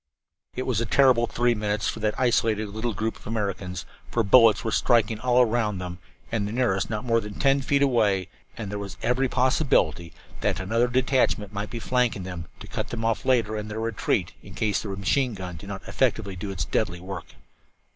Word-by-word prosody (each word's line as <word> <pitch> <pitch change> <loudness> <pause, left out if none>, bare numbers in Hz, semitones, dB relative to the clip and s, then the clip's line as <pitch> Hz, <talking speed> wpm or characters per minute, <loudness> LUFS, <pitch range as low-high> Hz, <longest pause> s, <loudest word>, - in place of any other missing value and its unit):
It 130 - -2
was 120 -4 0
a 115 - -2
terrible 125 -1 +4
three 120 +1 +2
minutes 105 -2 -1
for - - -3
that 105 -1 -1
isolated 110 -4 +2
little 110 +2 -3
group 110 +4 -2
of - - -14
Americans, 100 -5 -3 0.2
for 115 - +1
bullets 110 0 +6
were 110 - -1
striking 115 -3 +2
all 125 +1 +3
around 110 -3 0
them, 90 -1 -6 0.3
the 115 - 0
nearest 105 -1 0
not 110 +2 -3
more 115 -1 +2
than 105 -1 -8
ten 140 -1 +2
feet 140 +1 +2
away, 105 -8 +2 0.3
and 105 -3 -5
there 105 - -3
was 100 -2 -7
every 125 +3 +1
possibility 125 - +2 0.3
that - - 0
another 115 +6 +1
detachment 125 -5 +1
might 105 +1 -3
be 120 - -6
flanking 120 -4 0
them, 90 -3 -6
to - - -7
cut - - -4
them 115 -1 -4
off 115 0 0
later 115 -4 +2
in 105 0 -4
their 105 +1 -5
retreat, 115 -2 -1
in - - -12
case 105 -2 0
the 105 - -6
machine 105 +6 0
gun 90 -2 -6
did 100 +6 -10
not 95 -1 -7
effectively 110 -7 0
do 100 +3 -5
its 90 -3 -3
deadly 85 +1 -1
work. 95 -1 -8
110 Hz, 200 wpm, -25 LUFS, 100-120 Hz, 0.3 s, bullets